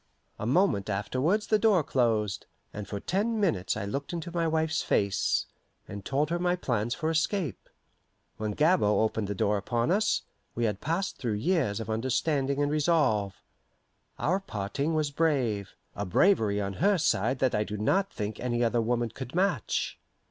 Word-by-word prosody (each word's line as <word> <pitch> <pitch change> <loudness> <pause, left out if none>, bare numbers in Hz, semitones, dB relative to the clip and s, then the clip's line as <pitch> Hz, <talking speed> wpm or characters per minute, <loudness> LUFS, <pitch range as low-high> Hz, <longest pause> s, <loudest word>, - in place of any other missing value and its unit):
A 105 - -3
moment 130 - +2
afterwards 130 - 0
the 215 - +2
door 205 -6 +4
closed, 110 -6 0 0.3
and 105 -1 -6
for 100 - -4
ten 215 - -1
minutes 105 - 0
I - - -3
looked 140 +10 -4
into 170 0 -4
my 170 -1 0
wife's 160 0 +1
face, 100 -1 +1 0.4
and 100 -1 -7
told 145 +6 0
her 175 - 0
my 180 0 +1
plans 120 -8 -1
for 160 -1 -1
escape. 165 - -1 0.7
When 110 -1 -2
Gabord 150 - +3
opened 110 -1 -2
the 100 - -3
door 105 +2 +1
upon 120 - 0
us, 205 +2 +2 0.3
we 120 - -1
had 105 -3 -2
passed 170 +6 -2
through 120 -4 -2
years 120 - 0
of 110 - -5
understanding 135 +5 0
and 145 - 0
resolve. 145 - +2 0.8
Our 185 +4 +1
parting 140 - -3
was 150 -2 0
brave 130 -11 0 0.2
a 100 - -3
bravery 105 - +3
on 100 -1 -2
her 200 +1 +4
side 130 - +1
that 130 -1 +1
I 105 - +2
do 105 0 -5
not 190 - +1
think 105 0 -4
any 120 -1 0
other 115 0 +2
woman 120 +1 0
could 130 +4 -8
match. 180 - 0
130 Hz, 170 wpm, -28 LUFS, 105-165 Hz, 0.8 s, door